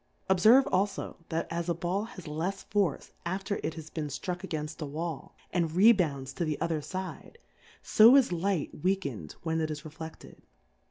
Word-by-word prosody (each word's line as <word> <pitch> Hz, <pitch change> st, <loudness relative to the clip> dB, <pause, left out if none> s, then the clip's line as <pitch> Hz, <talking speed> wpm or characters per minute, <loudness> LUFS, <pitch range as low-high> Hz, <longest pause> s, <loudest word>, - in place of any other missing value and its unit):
Obferve 220 Hz, +9 st, +7 dB
alfo, 195 Hz, +1 st, 0 dB
that 165 Hz, 0 st, -1 dB
as 170 Hz, +1 st, -2 dB
a 170 Hz, -, +1 dB
Ball 180 Hz, +5 st, -1 dB
has 215 Hz, -7 st, -11 dB
lefs 170 Hz, +6 st, -3 dB
^orce 195 Hz, -8 st, +1 dB
after 190 Hz, +3 st, -2 dB
it 160 Hz, -, -3 dB
has 155 Hz, -1 st, -9 dB
been 155 Hz, -2 st, -3 dB
flruck 145 Hz, +5 st, -4 dB
a^ainlt 155 Hz, -4 st, -5 dB
a -, -, -1 dB
Wall, 160 Hz, +1 st, -5 dB, 0.2 s
and 170 Hz, -3 st, +1 dB
rebounds 170 Hz, -, +4 dB
to 170 Hz, -, -2 dB
the 155 Hz, -3 st, -2 dB
other 160 Hz, -2 st, -1 dB
iide, 185 Hz, -, -6 dB, 0.5 s
fo 225 Hz, +4 st, +7 dB
is 275 Hz, -3 st, +5 dB
Liglit 175 Hz, -3 st, -1 dB
weakaed 140 Hz, -, -1 dB
when 160 Hz, -1 st, 0 dB
it 155 Hz, -, -1 dB
is 150 Hz, -1 st, -5 dB
reflefted. 160 Hz, +1 st, -10 dB
170 Hz, 170 wpm, -29 LUFS, 155-190 Hz, 0.5 s, Obferve